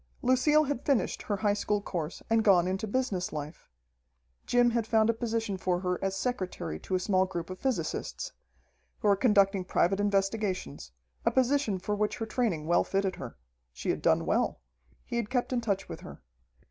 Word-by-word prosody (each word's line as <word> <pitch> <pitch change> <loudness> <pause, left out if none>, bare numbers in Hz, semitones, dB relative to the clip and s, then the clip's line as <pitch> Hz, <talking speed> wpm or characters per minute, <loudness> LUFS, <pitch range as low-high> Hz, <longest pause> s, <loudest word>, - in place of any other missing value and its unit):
Lucille 280 +5 +4
had 285 -3 -3
finished 275 -5 +1
her 205 - -2
high 205 0 +2
school 205 0 0
course 175 -5 -5
and 225 -1 +3
gone 180 -4 +5
into 190 +3 -2
business 205 -5 -1
life. 150 +1 -7 0.8
Jim 245 -1 +4
had 230 -2 0
found 220 0 +4
a - - -5
position 225 -3 -2
for 180 -1 0
her 180 0 -2
as 195 0 0
secretary 185 - -3
to 185 - -3
a - - +2
small 185 0 +2
group 175 -1 -5
of 185 - -7
physicists, 255 - -2 0.7
who - - +1
were 200 - +6
conducting 200 -3 +3
private 185 +1 +1
investigations, 195 - -1 0.3
a - - +4
position 260 -5 +2
for 195 +3 -3
which 210 0 -1
her 225 - -3
training 220 -10 -1
well 170 +2 +3
fitted 195 -1 -1
her. 125 -4 -8 0.4
She - - -2
had - - -3
done - - +3
well. - - +1 0.5
He - - -3
had 230 -3 -2
kept 255 0 0
in 245 - +1
touch 200 -4 -1
with - - -7
her. - - -11
205 Hz, 185 wpm, -29 LUFS, 185-235 Hz, 0.8 s, were